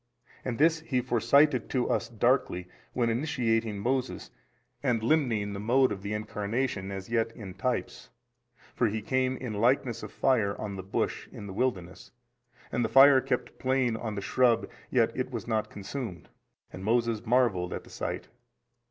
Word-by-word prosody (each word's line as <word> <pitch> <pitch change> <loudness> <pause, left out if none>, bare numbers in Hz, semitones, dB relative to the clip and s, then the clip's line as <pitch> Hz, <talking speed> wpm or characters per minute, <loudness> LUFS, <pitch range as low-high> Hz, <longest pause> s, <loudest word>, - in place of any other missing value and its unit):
And 120 -3 -3
this 160 +2 +4
He 145 -5 -1
foresignified 125 +3 +3
to 125 -2 0
us - - 0
darkly, 120 -6 +1 0.3
when 120 -2 +1
initiating 115 -5 0
Moses 130 +5 -2 0.5
and 120 -5 0
limning 115 -7 +1
the 100 - -5
mode 125 +5 +3
of 100 -2 -4
the 100 +1 -5
Incarnation 105 0 -2
as 95 +1 -6
yet 115 -1 +1
in 100 -6 -8
types, 120 +6 -3 0.6
for 120 - +2
He 110 0 -3
came 130 +2 0
in 125 -4 -5
likeness 120 +2 +1
of - - -8
fire 110 -6 +1
on 105 -2 -4
the 95 - -5
bush 95 +1 -2
in - - -9
the 95 - -7
wilderness, 95 -6 -2 0.6
and 120 - 0
the - - 0
fire 135 0 +8
kept 125 - -3
playing 130 -3 +1
on 110 -2 -4
the 100 - -3
shrub 120 +2 +2 0.2
yet 120 -3 +2
was 115 -5 -4
it - - -11
not 110 -1 0
consumed. 100 - -6 0.4
And 95 - -7
Moses 115 0 +1
marvelled 115 -7 +2
at - - -5
the - - -16
sight. - - -4
115 Hz, 170 wpm, -29 LUFS, 105-130 Hz, 0.6 s, fire